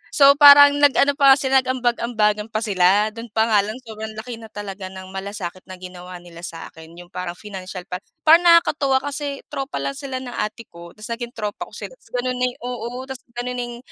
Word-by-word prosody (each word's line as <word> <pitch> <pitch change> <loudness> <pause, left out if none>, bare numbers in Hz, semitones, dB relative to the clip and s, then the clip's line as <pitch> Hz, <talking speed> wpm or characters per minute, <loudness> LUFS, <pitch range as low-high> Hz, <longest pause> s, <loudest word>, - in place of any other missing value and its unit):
So 280 -1 +8
parang 285 0 +9
nag-ano 285 0 +4
pa 275 -1 +7
sila, 265 -1 +2
nag-ambag-ambagan 235 -4 0
pa 220 0 -3
sila. 205 +1 +3
Dun 230 +2 -9
pa 225 +1 +2
nga 210 - +5
lang 210 +2 -2
sobrang 220 -1 -8
laki 225 +1 -7
na 225 - -11
talaga 200 -2 -7
ng 190 0 -10
malasakit 190 -2 -7
na 185 - -8
ginawa 180 0 -10
nila 170 -1 -13
sa 165 -1 -9
akin, 160 +1 -14
yung 175 +1 -13
parang 180 -1 -5
pinansyal 185 -2 -8
pa. 180 -1 -6 0.2
Parang 335 +3 +6
nakakatuwa 295 -6 +4
kasi 285 -1 -5
tropa 275 +1 -5
lang - - -2
sila 270 -2 -6
ng 245 - -7
ate 215 +1 -4
ko, 170 0 -13
tas 215 +2 -9
naging 240 +2 -5
tropa 210 -2 -5
ko - - -20
sila - - -7
tas - - -25
ganun 255 +1 -1
na 250 - +2
yung 245 - -8
oo, 245 +1 -5
tas 265 -1 -8 0.2
ganun 250 +1 -4
na - - -1
yung 240 0 -8
225 Hz, 215 wpm, -21 LUFS, 190-265 Hz, 0.2 s, parang